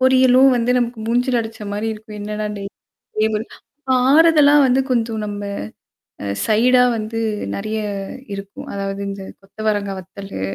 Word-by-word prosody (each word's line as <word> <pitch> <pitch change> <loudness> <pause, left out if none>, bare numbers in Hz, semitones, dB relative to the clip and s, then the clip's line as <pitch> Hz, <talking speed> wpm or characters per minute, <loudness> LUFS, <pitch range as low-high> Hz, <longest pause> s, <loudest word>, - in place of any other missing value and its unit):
பொரியலும் 260 0 +5
வந்து 240 +1 +1
நமக்கு 240 -1 -2
மூஞ்சில 245 +1 +2
அடிச்ச 220 0 -7
மாரி 210 +2 -2
இருக்கும். 215 0 -10
என்னடா 210 +1 -3
டெய்லி 200 0 -7 1.2
ஆறுதலா 295 +3 +5
வந்து 260 +1 +3
கொஞ்சம் 225 -2 0
நம்ம 205 0 -5 0.8
அ - - -4 0.2
சைடா 250 +3 +4 0.2
வந்து 220 +1 -4 0.4
நெறைய 215 +2 -3 0.5
இருக்கும். 200 +9 -8
அதாவது 195 0 -3
இந்த 195 0 -6 0.2
கொத்த 195 +2 -25
வரங்கா 205 -2 0
வத்தலு, 195 - -8
225 Hz, 130 wpm, -20 LUFS, 205-255 Hz, 1.2 s, பொரியலும்